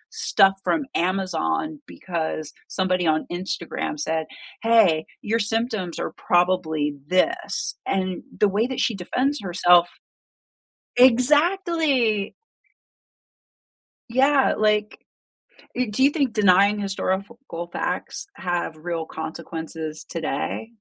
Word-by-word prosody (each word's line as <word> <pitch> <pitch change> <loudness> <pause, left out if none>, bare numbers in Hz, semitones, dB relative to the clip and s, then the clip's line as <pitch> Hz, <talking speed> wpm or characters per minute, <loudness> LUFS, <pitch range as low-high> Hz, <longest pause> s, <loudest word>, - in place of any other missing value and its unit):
stuff 195 0 +4
from 310 - +1
Amazon 185 - -1
because 160 -3 -4
somebody 185 -2 0
on 155 0 +2
Instagram 185 +10 -4
said, 160 - -1 0.3
"Hey, 215 -9 +4 0.2
your 225 +2 0
symptoms 220 -4 -1
are - - -4
probably 175 -5 +1
this," 345 - 0
and 185 -1 -1 0.2
the 210 - +5
way 210 +5 +1
that 260 -1 -4
she 235 - +1
defends 255 +10 -1
herself 175 -2 +4 1.1
exactly. 275 - +3 1.8
Yeah, 270 +3 +3
like, 210 0 +1 0.8
e 250 0 0
do 210 +4 -1
you 280 - +6
think 280 -7 0
denying 200 0 +4
historical 195 -1 -4
facts - - -3
have 175 -3 -3
real 165 0 -4
consequences 160 -1 -6
today? 165 +7 -4
195 Hz, 100 wpm, -23 LUFS, 175-245 Hz, 1.8 s, you